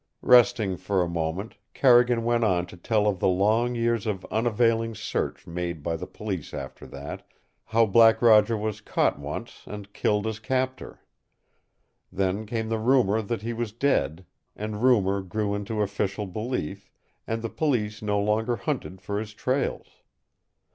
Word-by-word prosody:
Resting 120 -6 +5
for 95 0 0
a - - -2
moment, 85 +6 -3 0.2
Carrigan 120 -2 +5
went 120 0 +1
on 90 -5 +2
to - - -12
tell 105 +4 0
of 100 -3 +1
the - - +2
long 110 +6 +2
years 115 -2 0
of 95 -4 -3
unavailing 115 0 +1
search - - -3
made 85 -2 -4
by 85 +1 -1
the 80 - -6
Police 95 -9 -5
after 70 -2 -8
that; - - -7 0.4
how 115 +1 +3
Black 115 +2 +6
Roger 110 -1 +5
was 105 0 -3
caught - - 0
once - - -7
and 100 -1 -8
killed 105 0 0
his 110 -1 -3
captor. 130 +1 -3 1.1
Then 95 +3 -1
came 110 0 -3
the 115 -1 -1
rumor 110 -3 +3
that 110 0 -4
he 115 +1 -2
was 115 -2 -4
dead, 95 - 0 0.3
and 105 0 -5
rumor 100 -6 +3
grew 100 +2 -2
into 105 +1 -2
official 100 0 -2
belief, 105 -3 -4 0.4
and 115 0 -2
the 115 - -2
Police 110 -9 -1
no 105 -1 0
longer 110 +4 +1
hunted 120 - -4
for 100 +2 -2
his 105 0 -7
trails. 130 +4 -2
110 Hz, 160 wpm, -26 LUFS, 95-115 Hz, 1.1 s, Black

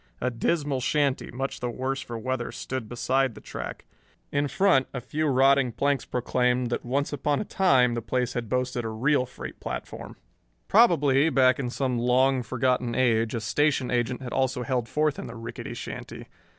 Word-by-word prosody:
A 125 - -1
dismal 140 +2 0
shanty, 140 +1 0
much 135 +3 -4
the 125 - -2
worse 135 +3 -3
for 120 -3 -6
weather, 130 +1 -3
stood 130 -4 -5
beside 130 0 0
the - - -10
track. - - -7 0.5
In 145 0 +1
front, 140 -2 +3
a - - -1
few 150 +6 -2
rotting 135 -1 +4
planks 140 +2 0
proclaimed 125 0 0
that - - -2
once 140 +4 -1
upon 145 +1 0
a - - -3
time 130 -13 +3
the 120 - -2
place 125 +2 -1
had 120 -3 -4
boasted 125 -1 -1
a 115 - -3
real 125 +4 +1
freight - - -9
platform. - - -6 0.5
Probably, 160 - +4
back 130 -3 +4
in 125 -3 -2
some 125 -1 -1
long 130 +2 +3
forgotten 125 0 0
age, 115 -3 +2
a 115 - -2
station 135 +4 +1
agent 125 +1 -1
had 125 - -6
also 130 -1 0
held 120 -1 -1
forth 150 -1 0
in - - -6
the 115 - -8
rickety 115 0 -7
shanty. - - -7
130 Hz, 180 wpm, -26 LUFS, 120-140 Hz, 0.5 s, rotting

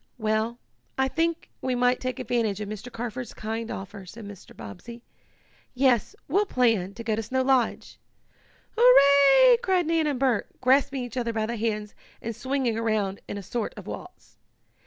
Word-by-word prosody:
"Well, 220 +1 -1 0.4
I 265 0 +2
think 330 +4 -2
we 255 -1 -1
might 245 +1 +2
take 255 0 -3
advantage 230 -5 -1
of 210 - -4
Mr. 215 +4 -7
Carford's 240 +1 -6
kind 225 +1 -4
offer," 195 +1 -7
said 220 +4 -10
Mr. 200 -2 -12
Bobbsey. 235 - -10 0.7
"Yes, 250 -3 +2
we'll 400 +8 +2
plan 225 - +1
to 230 - -7
go 220 -1 0
to 225 - -2
Snow 260 +4 -1
Lodge!" 260 -3 0 0.8
"Hurrah!" 440 - +7
cried 375 -6 +1
Nan 325 -1 +1
and 280 -4 -1
Bert, 255 -5 0
grasping 265 +1 +2
each 245 0 -7
other 235 -2 -1
by 220 -1 -1
the 235 +2 -3
hands 215 -2 -2 0.3
and 230 0 -5
swinging 260 -3 -1
around 215 -4 -1
in - - -5
a 200 - -7
sort 230 +3 -4
of - - -9
waltz. - - -10
240 Hz, 170 wpm, -26 LUFS, 220-265 Hz, 0.8 s, Hurrah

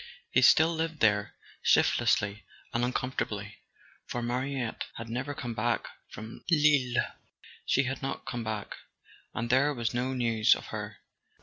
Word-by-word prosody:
He - - +4
still 160 +1 +6
lived 160 -1 -2
there, 105 -2 +2 0.3
shiftlessly 105 +1 +3 0.3
and 120 - +1
uncom¬ 125 +1 -1
fortably—for 110 +2 -6
Mariette 125 0 -2
had 115 0 -7
never 130 +5 -3
come 120 -3 -4
back 115 +1 0 0.2
from 110 +1 -9
Lille. 145 -6 +4 0.6
She 140 - +3
had 130 0 -3
not 135 - -4
come 120 -2 -4
back, 110 -2 -4 0.6
and 120 -1 -2
there 140 +3 +3
was 120 -1 -1
no 125 +2 -1
news 115 -3 +4
of - - -9
her. - - -5
120 Hz, 140 wpm, -29 LUFS, 115-135 Hz, 0.6 s, still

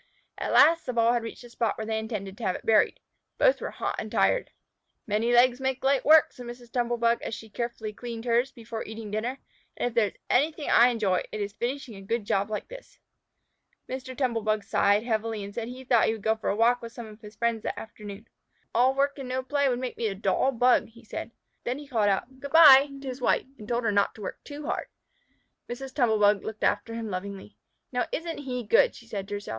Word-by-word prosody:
At - - -2
last 330 +1 +6
the 250 - -2
ball 230 0 +3
had 240 - +1
reached 230 +2 -8
the 240 - -12
spot 230 -2 -1
where 220 - -4
they 220 0 -1
intended 210 -3 -5
to 230 - -10
have 185 -3 0
it - - -9
buried. 220 -1 +3 0.4
Both - - +3
were - - -3
hot - - -3
and - - -6
tired. - - +2 0.6
"Many 220 +3 0
legs 245 +1 +4
make 265 0 -1
light 270 0 +2
work," 310 +1 +6
said 245 -1 -10
Mrs. 240 0 -10
Tumble 240 -1 0
bug, 235 0 +2
as 225 - -4
she 220 -1 -11
carefully 235 -2 -4
cleaned 235 +1 -7
hers 240 +3 +2
before 230 -2 -7
eating 220 -1 -8
dinner, 230 +5 -2 0.4
"and 245 - 0
if - - -14
there 230 -3 +3
is - - -10
anything 300 +3 +1
I 240 - +7
enjoy, 215 -7 +1
it 215 - -5
is 205 0 -3
finishing 250 +2 -4
a 195 - -10
good 215 +2 -2
job 200 +1 0
like 215 - -4
this!" - - -12 0.9
Mr. 260 0 -6
Tumble 245 -5 0
bug 215 -1 0
sighed 205 +2 +2
heavily 220 -2 -2
and 200 0 -8
said 230 0 -4
he 255 +2 -8
thought 240 -3 +3
he - - +2
would 220 -3 -8
go 220 0 +2
for 220 - -3
a - - +1
walk 235 +3 +3
with 230 -1 -8
some 235 - -7
of 215 0 -13
his 210 0 -12
friends 230 +1 0
that - - -4
afternoon. 210 0 -10 0.5
"All 255 +3 +3
work 280 +1 0
and 260 -2 -6
no 260 +1 -2
play 280 +1 +1
would 245 - 0
make 250 -1 -5
me 230 - 0
a 200 - -3
dull 200 +7 +1
Bug," 245 -1 +3
said 220 - -6
he. 230 - -26 0.3
Then 245 +2 -2
he 290 0 -10
called 220 -6 +2
out 250 +7 -2
"Good 280 0 -7
by" 290 -4 +9
to 275 - -8
his 255 0 -5
wife, - - +2
and 210 - -10
told 240 +1 -1
her 225 - +2
not 200 0 +1
to 220 - -12
work - - -6
too 290 0 -8
hard. - - -2 0.8
Mrs. 260 +2 -6
Tumble 235 -6 +2
bug 205 -1 +3
looked 220 -1 -6
after 225 +3 0
him 225 -2 -4
lovingly. 185 - -6 0.4
"Now, 250 -1 -1
isn't 330 -1 -4
he 250 -3 -4
good?" 210 - +4
she 235 - -13
said 200 -4 -5
to 205 - -4
herself. 205 - -7
235 Hz, 240 wpm, -27 LUFS, 215-255 Hz, 0.9 s, by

